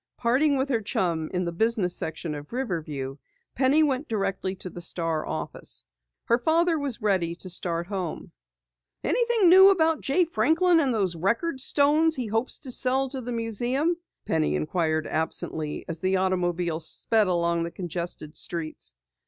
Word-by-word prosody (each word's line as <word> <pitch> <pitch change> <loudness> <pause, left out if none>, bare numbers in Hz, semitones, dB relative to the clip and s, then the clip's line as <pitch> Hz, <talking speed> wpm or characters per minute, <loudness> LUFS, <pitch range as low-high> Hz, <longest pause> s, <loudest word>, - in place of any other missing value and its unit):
Parting 270 +5 +2
with 265 +1 0
her 235 -4 +1
chum 170 -6 -1
in 180 -1 -1
the 170 - -2
business 200 -1 +1
section 160 0 -4
of 145 0 -8
Riverview, 155 - -4 0.4
Penny 275 +4 +3
went 280 0 0
directly 195 -3 -2
to 185 - -9
the 175 - -9
Star 165 -2 -1
office. - - -4 0.4
Her 235 +1 +2
father 325 +4 +2
was 270 -6 -1
ready 185 -5 +1
to 185 +1 -7
start 170 -1 -2
home. 185 -4 -5 0.7
"Anything 475 -5 +3
new 380 +2 +9
about 325 -5 +2
Jay 345 +6 +2
Franklin 335 +1 +3
and 275 -5 +2
those 195 -6 0
record 235 - -1
stones 305 +4 +3
he 255 - -3
hopes 225 +3 -1
to 260 - -7
sell 260 +2 +3
to 265 -1 -5
the 245 0 -6
museum?" 240 - 0 0.3
Penny 155 - 0
inquired 155 - -1
absently 155 -1 -2
as 165 -1 -4
the 190 +2 +1
automobile 175 -3 0
sped 210 +6 +1
along 170 -1 +1
the 170 - -2
congested 170 -3 -5
streets. 165 -2 -5
200 Hz, 160 wpm, -26 LUFS, 170-270 Hz, 0.7 s, new